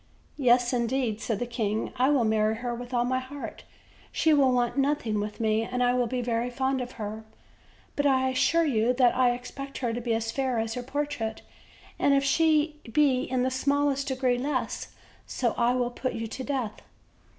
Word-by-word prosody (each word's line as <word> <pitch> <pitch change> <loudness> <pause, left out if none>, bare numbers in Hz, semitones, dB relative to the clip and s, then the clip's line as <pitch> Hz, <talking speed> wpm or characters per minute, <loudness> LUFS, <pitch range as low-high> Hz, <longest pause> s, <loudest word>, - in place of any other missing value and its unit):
"Yes, 245 -1 +4
indeed," 235 -2 0
said 225 - -1
the 245 - -2
king, 220 -3 -2
"I 255 +2 +3
will 280 -5 +3
marry 215 0 +2
her 240 +1 -3
with 245 +1 -7
all 240 -1 +1
my 255 +1 0
heart; 270 +2 -8 0.5
she 320 -1 +3
will 275 -3 +4
want 245 -1 +1
nothing 275 -6 0
with 210 +2 -4
me, 220 -1 +2
and 250 +2 -1
I 245 0 +3
will 250 -1 +1
be 250 +1 -2
very 235 0 -1
fond 265 +1 -1
of 250 0 -6
her; 215 0 -6 0.7
but 285 0 +2
I 260 -1 +3
assure 330 +6 +2
you 240 -4 +2
that 250 -1 +3
I 255 -1 +4
expect 275 +3 -8
her 240 -3 -1
to 240 - -3
be 230 -1 0
as 225 0 -2
fair 260 -3 -1
as 225 0 -1
her 250 - -4
portrait, 270 -4 -3 0.6
and 280 - +4
if 275 - +2
she 305 +1 +2
be 265 -1 +3
in 255 -1 0
the 260 - 0
smallest 280 +1 +1
degree 260 -2 +1
less 270 0 -2 0.4
so 240 -3 -1
I 240 +1 +2
will 245 -1 0
put 255 +1 -3
you 225 - -4
to 230 +4 -6
death." 255 -6 -3
250 Hz, 200 wpm, -27 LUFS, 235-270 Hz, 0.7 s, Yes